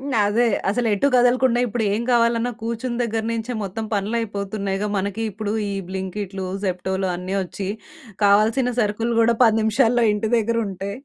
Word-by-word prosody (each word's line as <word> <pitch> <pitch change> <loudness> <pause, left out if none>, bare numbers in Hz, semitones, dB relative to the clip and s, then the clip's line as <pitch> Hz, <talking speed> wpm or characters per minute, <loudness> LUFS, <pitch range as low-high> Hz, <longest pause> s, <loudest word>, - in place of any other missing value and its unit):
హ్మ్. 280 +1 -5 0.2
అదే. 230 +4 +2 0.2
అసలెటూ 225 +1 +1
కదలకుండా 245 0 +4
ఇప్పుడు 225 -1 -2
ఏం 220 +3 0
కావాలన్నా 235 0 +2
కూర్చున్న 235 +1 -3
దగ్గర 225 -1 -1
నుంచే 230 +2 -3
మొత్తం 200 +3 -4
పనులయిపోతున్నాయిగా. 200 -1 -2
మనకి 200 +3 -3
ఇప్పుడు 210 +1 -4 0.2
ఈ - - -3 0.2
బ్లింకిటులు, 190 0 -4 0.2
జెప్టోలు 190 +1 -1
అన్నీ 185 +2 -4
వచ్చి 190 +1 -5 0.6
కావాల్సిన 220 +5 +4
సరుకులు 225 +2 0
గూడా 230 0 +3
10 225 -1 +4
నిమిషాల్లో 235 +2 +3
ఇంటి 210 +1 -2
దగ్గర 230 +1 +1
ఉంటే 195 +1 -5
220 Hz, 145 wpm, -22 LUFS, 200-235 Hz, 0.6 s, కదలకుండా